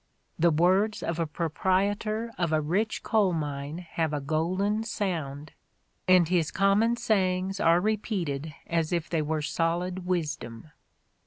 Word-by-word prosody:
The 170 +2 +5
words 185 +7 +2
of 170 0 -2
a 165 - 0
proprietor 200 +8 0
of 175 -3 -1
a 155 - +3
rich 190 +9 -1
coal 210 -4 +2
mine 150 +2 -4
have 160 -2 -1
a 150 - 0
golden 185 +9 0
sound, 155 -10 -3 0.6
and 180 -2 +6
his 170 -3 +1
common 200 +4 +3
sayings 190 -3 0
are 170 +1 +4
repeated 180 -8 -2
as 165 -2 -1
if 170 -2 -2
they 165 -2 +1
were 155 0 -1
solid 175 +3 -1
wisdom." 150 -7 -3
175 Hz, 140 wpm, -27 LUFS, 155-195 Hz, 0.6 s, and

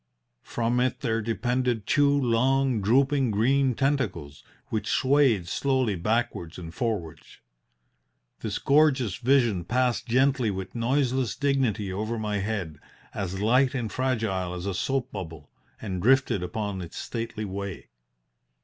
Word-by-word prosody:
From 120 +1 -1
it 130 0 0
there 115 -4 0
depended 115 +1 -1
two 145 -1 +3
long, 130 -2 +2
drooping 135 +5 +3
green 130 +5 +2
tentacles, 105 - -1 0.3
which 110 - -2
swayed 130 -9 +3
slowly 130 +2 0
backwards 95 -3 -2
and 85 -2 -8
forwards. 100 -7 -4 1.0
This - - -3
gorgeous 140 - +3
vision 120 -7 +2
passed 125 +5 0
gently 130 -1 +2
with 95 -1 -5
noiseless 125 0 0
dignity 125 -9 0
over 110 +4 -3
my 105 -2 -2
head, 95 -7 -3 0.3
as 95 0 -4
light 130 +5 +3
and 115 -4 -3
fragile 110 -9 -1
as 90 +1 -6
a 100 - -1
soap 135 +6 -1
bubble, 80 -6 -8 0.3
and 95 -4 -4
drifted 130 -3 +3
upon 95 +2 -3
its 85 -2 -9
stately 115 -2 -4
way. 100 -1 -6
115 Hz, 130 wpm, -26 LUFS, 100-130 Hz, 1.0 s, two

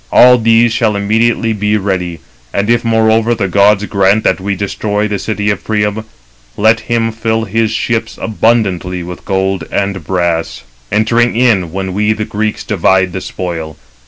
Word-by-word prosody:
All 125 0 +6
these 115 +1 +3
shall 110 -3 +1
immediately 110 +3 +1
be 105 0 0
ready; 90 -5 -3 0.3
and 100 - 0
if, 120 -1 +2
moreover, 115 0 +2
the 100 -3 -1
gods 100 +2 +3
grant 100 +1 +2
that 95 - +1
we 100 +1 -2
destroy 105 +1 -2
the 105 - -1
great 100 -1 -3
city 105 -1 -2
of 100 - -4
Priam, 105 0 -1 0.5
let 110 +2 +3
him 115 0 -1
fill 110 0 -1
his 110 +1 0
ships 110 0 -2
abundantly 100 -6 0
with 90 +1 -9
gold 95 -2 -1
and 100 -1 -2
brass, 85 -6 -2 0.3
entering 115 +3 +2
in 110 -9 +2
when 95 +1 -4
we 105 +2 +1
the 105 0 -4
Greeks 105 +1 -3
divide 95 -3 +1
the 95 - -4
spoil. 80 -4 -5
105 Hz, 165 wpm, -13 LUFS, 95-110 Hz, 0.5 s, All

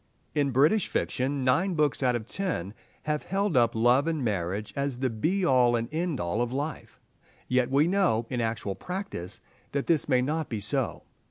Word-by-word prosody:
In 145 -2 +1
British 150 - +3
fiction 135 +2 -1
nine 170 +9 +2
books 150 -3 +1
out 125 -2 +2
of 115 -2 -3
ten 120 - -3 0.3
have 150 -1 0
held 195 -1 -1
up 120 -3 +3
love 120 +6 +4
and 160 -6 -1
marriage 100 0 -2
as 140 -2 -1
the 130 -1 -1
be 175 - 0
all 125 -4 +4
and 115 0 -1
end 165 -3 -1
all 85 +7 -1
of 120 0 -1
life. 145 +4 -5 0.5
Yet 125 -1 +2
we 140 +4 +3
know, 180 - +2
in 125 -2 -1
actual 110 -3 -2
practice, 180 - -6 0.3
that 140 -1 -1
this 160 -3 +1
may 125 -2 +3
not 155 +3 -2
be 110 - -3
so. 105 - -1
130 Hz, 185 wpm, -27 LUFS, 115-160 Hz, 0.5 s, love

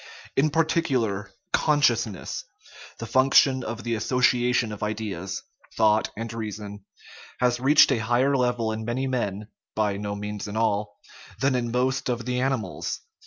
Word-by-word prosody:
In 145 +3 +3
particular, 135 -10 0 0.2
consciousness 120 - +1 0.5
the 115 - -6
function 130 +1 +4
of 115 +1 -5
the 120 - -1
association 125 0 +2
of 105 - -7
ideas, 105 -4 -4 0.3
thought, 110 -1 +3
and 115 0 -5
reason 105 -2 -6 0.5
has 125 -1 +2
reached 140 +3 +6
a 125 - +2
higher 120 +5 +2
level 120 -3 +1
in 110 0 -4
many 120 +4 -2
men 110 -5 -2 0.3
(by 105 -2 0
no 100 0 -4
means 105 0 -5
in 105 +1 -5
all) 105 -2 0 0.4
than 135 0 +2
in 120 -2 -1
most 130 +2 0
of 120 -2 -2
the 125 0 -1
animals. 130 -4 -2
115 Hz, 145 wpm, -25 LUFS, 105-130 Hz, 0.5 s, reached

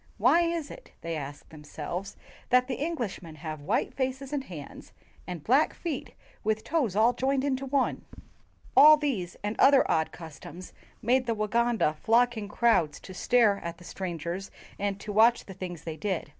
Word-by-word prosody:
"Why 345 - +5
is 335 -3 -1
it," - - -13
they 165 0 -3
asked 145 -1 -7
themselves, 160 +5 -6 0.3
"that 250 0 +4
the 270 +1 -3
Englishmen 220 - -4
have 155 -1 -6
white 145 - -1
faces 265 +1 -3
and 280 -2 -1
hands 155 - -10 0.3
and 175 -4 -6
black 270 +6 +3
feet 320 -7 -5 0.3
with 220 0 0
toes 250 - 0
all 225 +3 +4
joined 265 +1 0
into 275 -1 -1
one?" 270 -1 0 0.7
All 305 +1 +9
these 230 - -2
and 210 +1 -2
other 275 -1 +6
odd 160 0 +1
customs 165 +2 -10 0.3
made 250 +2 +2
the 230 - +1
Waganda 215 -6 +1
flock 240 +4 +3
in 215 -2 -5
crowds 210 -9 +2
to 190 - -10
stare 215 0 +3
at 170 0 -6
the 175 - -15
strangers 175 +1 -5 0.3
and 200 -1 -2
to 210 +1 -6
watch 230 +3 +4
the 195 - -9
things 175 -3 -7
they 160 -1 -6
did. 190 -6 -2
215 Hz, 170 wpm, -28 LUFS, 175-260 Hz, 0.7 s, All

